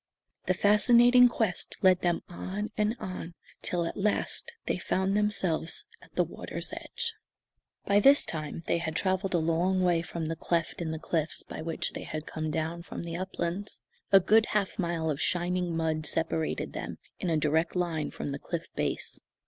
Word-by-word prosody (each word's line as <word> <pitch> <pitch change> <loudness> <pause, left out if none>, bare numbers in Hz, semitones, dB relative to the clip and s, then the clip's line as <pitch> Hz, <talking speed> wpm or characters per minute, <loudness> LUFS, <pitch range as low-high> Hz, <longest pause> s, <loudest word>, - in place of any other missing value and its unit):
The 185 - +3
fascinating 240 +5 +6
quest 220 -6 -1
led 185 -1 +6
them 175 -1 +1
on 195 +4 -4
and 210 +2 +1
on 175 -2 -6 0.3
till 175 -1 -1
at - - -4
last 210 - 0
they - - -1
found 190 +1 0
themselves 195 -6 +1 0.2
at - - -19
the - - +4
water's - - -6
edge. - - -4 0.7
By 200 0 +4
this 275 +7 +6
time 155 +1 -3
they 170 - +1
had 160 -2 -3
travelled 190 0 0
a - - +5
long 170 +3 +2
way 175 -2 +3
from 170 -1 -4
the 165 +1 -2
cleft 170 +1 -1
in 165 - -2
the 160 - -2
cliffs 160 -2 -1
by - - -7
which 165 0 -2
they - - -6
had 155 0 -5
come 155 0 -3
down 160 +2 -2
from 170 - -7
the 170 -1 -5
uplands. 185 +2 -3 0.3
A 195 - +9
good 215 +4 +4
half 205 -2 -1
mile 170 -3 0
of 145 +1 -3
shining 175 -1 0
mud 155 -1 0
separated 160 0 -1
them, - - -5 0.2
in 180 - -1
a 160 - +2
direct 155 +3 +1
line, 170 -4 0
from 145 - -5
the 140 - -4
cliff 170 +1 -5
base. - - -2
175 Hz, 180 wpm, -29 LUFS, 160-195 Hz, 0.7 s, A